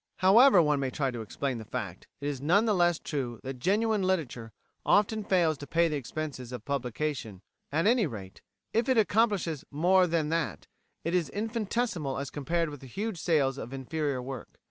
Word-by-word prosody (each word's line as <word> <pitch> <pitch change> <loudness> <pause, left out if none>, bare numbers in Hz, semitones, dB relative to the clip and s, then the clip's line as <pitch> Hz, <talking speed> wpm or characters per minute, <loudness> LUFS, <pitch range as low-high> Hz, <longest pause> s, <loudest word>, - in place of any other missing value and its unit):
However 200 0 +7
one 150 -2 +2
may 135 -1 -1
try 135 0 -1
to 120 -2 -5
explain 125 +3 -3
the - - -7
fact, - - -6
it 140 - -2
is 140 -3 -3
none 180 +10 +3
the 215 - +3
less 175 -3 +3
true 125 -9 -4
that 130 -1 -6
genuine 210 - +2
literature 150 -12 -1 0.3
often 210 +1 +3
fails 170 -7 +2
to 145 - -8
pay 170 0 +3
the 155 - -2
expenses 140 -2 -5
of 125 - -7
publication; 130 -6 -3 0.3
at 160 +5 +1
any 225 -3 +4
rate, 100 -7 -9 0.3
if 230 +4 +1
it 260 - +3
accomplishes 205 - +2
more 180 +5 +4
than 160 -2 0
that, 165 0 -2 0.4
it 165 - -2
is 180 -3 +1
infinitesimal 215 - -2
as 140 -1 -4
compared 165 +2 -1
with 145 - -8
the 135 - -11
huge 200 - -4
sales 140 -5 +2
of 120 - -7
inferior 135 0 -2
work. 130 0 -8
155 Hz, 190 wpm, -29 LUFS, 135-190 Hz, 0.4 s, However